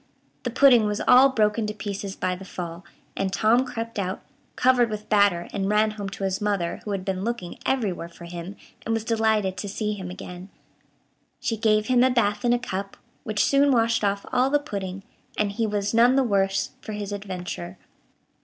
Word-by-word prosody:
The 245 - -2
pudding 245 -3 +5
was 210 0 -1
all 255 +2 +7
broken 215 -3 +1
to 210 - -4
pieces 200 -1 -5
by 185 - -1
the 185 - -10
fall, 175 -2 -7 0.3
and 195 -1 -1
Tom 225 +5 +3
crept 230 -3 -5
out, 190 0 -3 0.3
covered 250 -2 +4
with 215 0 -6
batter, 200 -5 +3
and 195 -1 -1
ran 215 +1 +3
home 205 -2 -5
to 195 - -7
his 190 0 -1
mother, 200 -5 -1
who - - -7
had 190 -1 -4
been 190 -1 -2
looking 225 -6 -4
everywhere 200 -10 -1
for 170 0 -12
him, 175 +3 -7 0.3
and 225 - 0
was 225 - -2
delighted 220 -4 +1
to 205 - -4
see 210 +1 -2
him 190 -3 -6
again. 180 +1 -9 0.9
She 225 - -1
gave 215 -1 +2
him 250 0 +4
a 260 - +5
bath 210 -4 +1
in 240 - +3
a 245 - +4
cup, 195 -5 -5 0.3
which 210 -1 +1
soon 280 0 +4
washed 230 -2 +2
off 200 0 0
all 255 +1 +3
the 290 - +4
pudding, 195 -9 -5 0.3
and 210 -1 +1
he 225 +2 -1
was 205 0 -1
none 240 +3 +5
the 270 - +4
worse 195 -4 +1
for 215 - -7
his 205 -1 -5
adventure. 180 - -6
210 Hz, 200 wpm, -25 LUFS, 195-230 Hz, 0.9 s, all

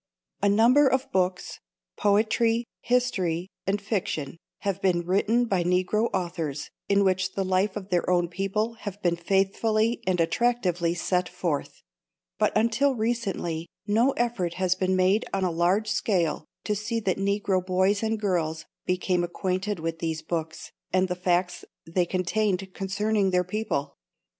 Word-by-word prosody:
A 200 - +3
number 240 +8 +5
of 265 0 0
books 185 -1 -1 0.4
poetry, 225 +3 +2
history 190 -9 0 0.2
and 200 +2 +1
fiction 185 -8 -3 0.2
have 195 -1 -2
been 175 -3 +1
written 215 +6 +2
by 190 -6 +1
Negro 185 +6 +1
authors 165 -5 -3 0.2
in 200 0 +4
which 185 -1 +1
the 195 - 0
life 190 +2 +1
of 200 -2 -6
their 180 -1 +1
own 175 -1 +3
people 195 +5 -1
has 205 -2 -6
been 175 -4 +1
faithfully 200 +6 +1
and 185 -1 +1
attractively 175 -2 +1
set 180 +1 0
forth; 175 -5 -3 0.6
but - - +3
until 235 +5 +2
recently 200 -8 -2 0.2
no 230 +6 +3
effort 220 -8 -1
has 185 -1 +2
been 185 0 0
made 185 +4 +3
on 195 - 0
a 180 - +1
large 185 +6 +1
scale 180 -8 0 0.2
to 210 - 0
see 215 +3 -2
that 195 -2 0
Negro 200 -1 +1
boys 190 +2 +2
and 220 -1 -1
girls 160 -6 -1 0.2
became 180 -1 +1
acquainted 185 +2 -2
with 165 0 -3
these 160 -1 -3
books 160 -1 -4 0.2
and 185 0 +2
the 180 - -1
facts 180 0 0 0.2
they 175 +2 0
contained 190 +1 -1
concerning 200 +1 0
their 180 -1 +2
people. 185 -6 -2
190 Hz, 150 wpm, -26 LUFS, 175-215 Hz, 0.6 s, number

